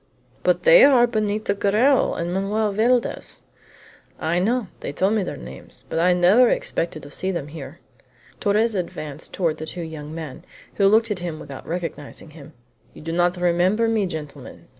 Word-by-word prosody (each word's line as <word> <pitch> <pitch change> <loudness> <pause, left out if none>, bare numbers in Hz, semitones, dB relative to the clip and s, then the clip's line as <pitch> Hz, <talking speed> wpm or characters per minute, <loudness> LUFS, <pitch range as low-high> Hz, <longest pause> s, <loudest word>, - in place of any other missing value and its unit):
"But - - +1
they - - +8
are 255 -4 +6
Benito 215 -3 -1
Garral 215 +7 +2
and 170 +1 -3
Manoel 205 +3 0
Valdez." 235 +4 0 0.8
"I 170 +2 0
know. 230 +5 +1
They - - -5
told 190 +8 +1
me 220 - +1
their 185 - -4
names, 65 +2 -11
but - - -1
I 180 +2 +4
never 185 +8 +5
expected 165 -2 -2
to 145 - -11
see 185 - -3
them 170 -6 -3
here." 150 0 -9 0.6
Torres 215 +2 +2
advanced 155 -5 -4
toward 165 -4 -1
the 155 - -6
two 175 +1 -5
young 155 -2 -8
men, 155 -5 -7 0.3
who 195 - +3
looked 220 +2 +3
at 200 - -1
him 170 -3 -5
without 140 -2 -10
recognizing 165 -2 -6
him. 155 0 -13 0.4
"You - - -12
do 165 - -4
not 175 +2 +1
remember 180 +6 +2
me, 220 -3 +1
gentlemen?" 155 -4 -9
180 Hz, 175 wpm, -22 LUFS, 160-215 Hz, 0.8 s, they